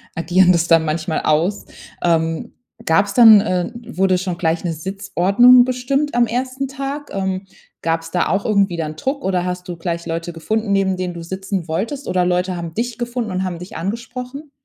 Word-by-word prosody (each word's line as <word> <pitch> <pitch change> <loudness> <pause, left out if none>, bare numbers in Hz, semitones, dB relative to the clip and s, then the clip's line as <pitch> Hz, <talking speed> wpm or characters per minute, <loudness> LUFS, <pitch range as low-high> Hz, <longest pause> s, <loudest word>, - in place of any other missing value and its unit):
agieren 180 +2 +4
das 170 -1 +2
dann 165 -1 +4
manchmal 160 +2 -2
aus. 170 +7 +1 0.4
Ähm, 165 +5 0 0.3
gab's 195 +5 +2
dann, 225 -4 +9
äh 185 +1 -1 0.2
wurde 185 0 +3
schon 180 -2 -3
gleich 165 -1 0
'ne 170 -2 -1
Sitzordnung 195 +7 +4
bestimmt 260 +4 -1
am 240 0 +3
1. 255 +3 -2
Tag? 275 +2 -5
Ähm, 190 0 -2 0.3
gab's 165 0 -2
da 180 - +1
auch 195 +1 0
irgendwie 200 -5 +2
dann 155 -2 -3
Druck 275 - -3
oder 185 -2 0
hast 180 0 -4
du 175 - -5
gleich 170 0 -4
Leute 165 0 -4
gefunden, 215 +5 -2
neben 195 -1 +2
denen 180 -1 -3
du 170 - -7
sitzen 190 0 -4
wolltest 235 - -3
oder 180 -1 +1
Leute 180 +1 0
haben 170 -2 -6
dich 235 0 -2
gefunden 240 -3 -3
und 185 +1 -1
haben 180 -2 -3
dich 180 - -10
angesprochen? 250 - -6
190 Hz, 185 wpm, -19 LUFS, 170-235 Hz, 0.4 s, dann